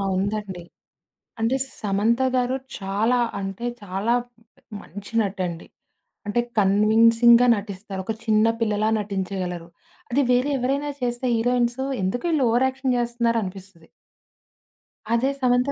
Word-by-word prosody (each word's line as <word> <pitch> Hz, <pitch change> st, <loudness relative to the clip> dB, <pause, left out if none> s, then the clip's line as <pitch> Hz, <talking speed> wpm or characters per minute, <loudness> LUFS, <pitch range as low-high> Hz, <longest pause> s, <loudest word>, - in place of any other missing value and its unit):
ఉందండి. 195 Hz, -2 st, -3 dB, 0.8 s
అంటే, 235 Hz, +4 st, +2 dB, 0.2 s
'సమంత' 220 Hz, +5 st, +1 dB
గారు 250 Hz, +1 st, +1 dB, 0.2 s
చాలా 210 Hz, +6 st, +1 dB, 0.2 s
అంటే 195 Hz, +4 st, -5 dB, 0.2 s
చాలా 200 Hz, +5 st, -1 dB, 0.7 s
మంచి 205 Hz, +3 st, -11 dB
నటండి. 185 Hz, -4 st, -3 dB, 0.6 s
అంటే, 240 Hz, +4 st, +1 dB, 0.2 s
కన్విన్సింగ్‌గా 230 Hz, +4 st, +5 dB
నటిస్తారు. 200 Hz, -1 st, -6 dB
ఒక 220 Hz, -, -2 dB
చిన్న 215 Hz, 0 st, +4 dB, 0.2 s
పిల్లలా 215 Hz, 0 st, +1 dB
నటించగలరు. 185 Hz, -4 st, -4 dB, 0.4 s
అది 280 Hz, +3 st, +3 dB
వేరే 250 Hz, +4 st, +2 dB
ఎవరైనా 280 Hz, +4 st, -1 dB
చేస్తే 240 Hz, +1 st, -1 dB
హీరోయిన్స్ 245 Hz, +2 st, +1 dB, 0.2 s
ఎందుకు 190 Hz, -, -2 dB
ఈళ్ళు 285 Hz, -5 st, +2 dB
ఓవర్‌యాక్షన్ 260 Hz, +1 st, +1 dB
జేస్తున్నారు 235 Hz, -1 st, 0 dB
అనిపిస్తది. 185 Hz, -3 st, -9 dB, 1.3 s
అదే 255 Hz, +4 st, +2 dB
'సమంత' 250 Hz, +1 st, +2 dB
225 Hz, 105 wpm, -23 LUFS, 195-245 Hz, 1.3 s, కన్విన్సింగ్‌గా